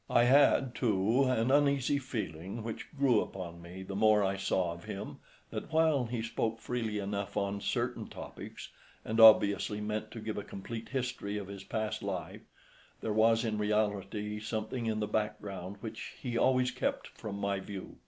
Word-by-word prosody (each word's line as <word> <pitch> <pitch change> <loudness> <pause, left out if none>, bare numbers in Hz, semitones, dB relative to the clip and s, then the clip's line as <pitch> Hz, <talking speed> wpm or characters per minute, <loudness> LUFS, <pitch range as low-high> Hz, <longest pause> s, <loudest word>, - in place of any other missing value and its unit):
I 120 - +5
had, 130 0 +5
too, 115 +3 +2
an 130 -1 +2
uneasy 140 -1 +3
feeling, 110 - -5
which 115 -1 -5
grew 130 -5 +4
upon 85 -3 -6
me 90 +2 -8
the 95 +1 -6
more 105 0 +5
I 95 0 +1
saw 95 -3 0
of 85 +3 -11
him, 105 -1 -6 0.3
that - - -5
while 160 -5 +3
he 115 -1 -3
spoke 115 0 -1
freely 115 -3 -2
enough 100 0 -3
on 100 0 -1
certain - - -1
topics, - - -9 0.4
and 110 +1 -1
obviously 105 -1 +7
meant 105 +1 -3
to 115 - -8
give 110 -1 -3
a - - -5
complete 110 +4 -7
history 125 -6 -2
of 100 -2 -6
his 100 -1 -7
past 110 +2 -2
life, - - -4 0.6
there 110 - -1
was 115 +2 +4
in 110 -1 -1
reality 105 0 0
something 110 +2 -3
in 110 -1 0
the - - +1
background 105 -3 -3
which 110 -1 -6
he 125 -3 -4
always 125 +1 +3
kept 125 - -1
from 105 -3 -7
my 100 -1 -1
view. 95 -1 -8
110 Hz, 175 wpm, -32 LUFS, 100-120 Hz, 0.6 s, obviously